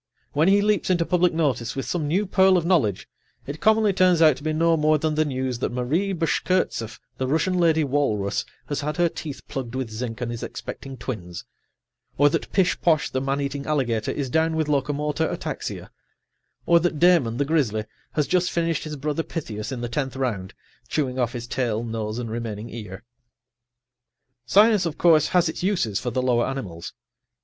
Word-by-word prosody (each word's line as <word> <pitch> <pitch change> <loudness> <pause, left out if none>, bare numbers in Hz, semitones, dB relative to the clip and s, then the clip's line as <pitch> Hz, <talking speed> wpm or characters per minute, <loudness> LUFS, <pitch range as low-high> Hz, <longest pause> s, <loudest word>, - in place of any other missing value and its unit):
When 155 +4 +3
he 200 +1 +5
leaps 210 -2 +1
into 175 -2 +2
public 180 0 +2
notice 130 -8 -1
with 135 - -3
some 160 -4 -2
new 185 +8 +1
pearl 190 -1 +4
of 170 - -1
knowledge, 150 - +1 0.4
it 145 +3 -6
commonly 220 -1 +4
turns 180 -2 +4
out 155 -4 +6
to - - -12
be 155 - 0
no 165 +1 +3
more 155 0 +3
than 155 +1 -1
the 155 +1 +2
news 130 -4 -2
that - - -1
Marie 145 +11 0
Bashkirtseff, 165 - -1 0.2
the 130 - -1
Russian 160 +6 +1
lady 165 -3 +3
walrus, 130 -8 0 0.2
has 145 +3 -3
had 150 +3 -3
her 175 0 +4
teeth 150 -3 -8
plugged 130 -2 -5
with 130 -4 -3
zinc 115 +1 -5
and 120 -1 -3
is 120 - -5
expecting 135 -1 -7
twins. 90 -8 -6 0.7
Or 145 +1 +5
that - - -2
Pishposh, 175 -4 +2
the 130 - -1
man 135 +1 -1
eating 140 0 -4
alligator, 120 -8 0
is 135 -4 -3
down 160 +2 +2
with 160 -1 0
locomotor 150 +2 0
ataxia. - - -5 0.7
Or 170 0 +5
that 170 -2 -1
Damon, 165 -9 +4
the 145 - +1
grizzly, 125 -9 0 0.3
has 150 - +1
just 180 +2 +1
finished 165 -2 -1
his 155 -1 -5
brother 150 +2 -2
Pythias 115 -10 -5
in 125 -2 -4
the 120 - -2
tenth 135 +1 -3
round, 115 -8 -3 0.3
chewing 130 -4 -1
off 125 -1 0
his 120 -1 -5
tail, 120 -3 -1
nose 110 -1 -4
and 120 -2 -4
remaining 115 -1 -5
ear. 105 -2 -8 1.4
Science, 205 - +5
of 160 - -5
course, 160 -3 +5
has 180 -1 +3
its 160 - -4
uses 175 - 0
for 125 - -3
the 130 +1 -1
lower 120 -2 +2
animals. 100 -12 -5
145 Hz, 190 wpm, -24 LUFS, 120-165 Hz, 1.4 s, out